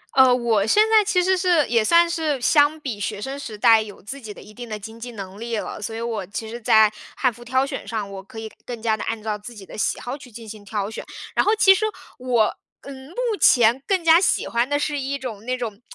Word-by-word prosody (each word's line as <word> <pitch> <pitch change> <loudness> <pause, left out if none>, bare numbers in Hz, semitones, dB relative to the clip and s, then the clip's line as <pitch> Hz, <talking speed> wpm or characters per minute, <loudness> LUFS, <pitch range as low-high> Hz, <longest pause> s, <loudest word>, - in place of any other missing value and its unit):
呃， 260 -1 +7
我 230 -5 +1
现 420 - +5
在 440 -1 +6
其 375 -3 +1
实 375 +1 +3
是 355 -5 +2
也 230 -2 +2
算 340 +9 +5
是 320 -5 -1
相 290 +4 +3
比 250 -9 -5
学 205 +1 -3
生 270 +4 -5
时 220 -6 -7
代 225 0 +6
有 210 -2 -9
自 275 +8 -8
己 220 -3 -8
的 - - -14
一 210 - -14
定 240 +2 -9
的 215 - -4
经 220 +2 -10
济 245 +1 -7
能 195 -2 -8
力 230 0 -3
了。 210 - -5
所 225 +2 -4
以 225 - -5
我 230 -3 -3
其 220 +3 -6
实 235 +1 -7
在 220 -1 +5 0.2
汉 255 -3 +1
服 240 +2 -13
挑 260 +2 +1
选 275 -1 -6
上， 220 -3 -3
我 195 - -7
可 200 +3 -15
以 220 - -6 0.2
更 240 -2 -6
加 220 -1 +1
地 215 - -6
按 225 -1 -3
照 215 -1 -3
自 235 +3 -10
己 200 -2 -11
的 - - -11
喜 - - 0
好 245 +2 -5
去 255 -3 -14
进 230 0 -10
行 215 -1 -10
挑 200 0 -3
选。 220 - -7 0.3
然 - - +3
后 425 - +3
其 405 -3 +7
实 430 +3 0 0.3
我， 250 -3 +2 0.4
呃， 280 - -10
目 265 +5 -13 0.3
前 240 0 +5
更 380 -3 +1
加 330 +1 +6
喜 - - +1
欢 235 +2 0
的 290 - +1
是 295 -1 -2
一 275 +1 -3
种 230 -6 -7
那 255 +1 -1
种 225 -3 -6
235 Hz, 280 characters per minute, -22 LUFS, 220-280 Hz, 0.4 s, 呃